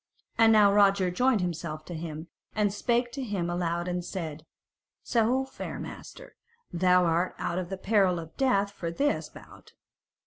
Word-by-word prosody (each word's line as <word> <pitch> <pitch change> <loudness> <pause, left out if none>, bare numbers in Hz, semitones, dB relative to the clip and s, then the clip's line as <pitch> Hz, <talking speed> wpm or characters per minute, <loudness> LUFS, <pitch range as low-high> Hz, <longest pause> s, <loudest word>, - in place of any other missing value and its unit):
And 225 -1 +5
now 210 -2 +6
Roger 200 -2 +4
joined 250 +2 +2
himself 165 -3 -4
to 175 - -7
him, 160 0 -6 0.3
and 210 -2 +1
spake 240 +3 0
to 275 - -5
him 190 -7 -2
aloud 175 0 -1
and 180 0 -2
said: 165 -4 -6 0.6
"So, 245 +3 +1
fair 265 - -7
master, - - -10 0.4
thou 180 +1 +4
art 170 +2 0
out 175 - -2
of 180 -1 -5
the 190 - -4
peril 190 -2 +2
of 165 -1 -8
death 205 -7 +2
for 170 -4 -5
this 285 +12 -1
bout." - - -15
185 Hz, 165 wpm, -28 LUFS, 170-220 Hz, 0.6 s, now